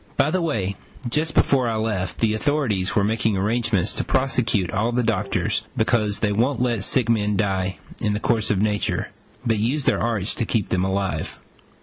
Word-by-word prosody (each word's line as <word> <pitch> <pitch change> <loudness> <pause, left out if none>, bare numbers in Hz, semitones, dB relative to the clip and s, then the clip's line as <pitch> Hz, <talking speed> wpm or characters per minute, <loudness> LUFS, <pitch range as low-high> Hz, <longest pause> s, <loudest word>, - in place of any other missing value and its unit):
By 150 - +3
the 185 - +1
way, 100 - -1 0.3
just 155 +6 0
before 130 -4 +3
I 115 - -1
left, 105 -5 -2
the 110 -2 +3
authorities 110 -6 0
were 105 - +3
making 110 -1 +1
arrangements 105 -1 +1
to - - -2
prosecute 125 -8 +1
all 110 +4 0
the 120 +1 +1
doctors, 115 0 -1
because 110 -2 +1
they 105 - +2
won't 120 +5 +1
let 120 -5 0
sick 120 +3 +1
men 105 -3 +1
die 95 -2 0 0.2
in 105 -2 0
the 105 - -1
course 110 -1 +1
of 105 - +1
nature, 105 -1 0 0.4
but 115 -2 +1
use 130 +7 0
their - - +2
arts 115 -4 0
to 115 - -2
keep 110 -5 0
them 90 0 +1
alive. 95 0 -2
110 Hz, 190 wpm, -23 LUFS, 100-120 Hz, 0.4 s, By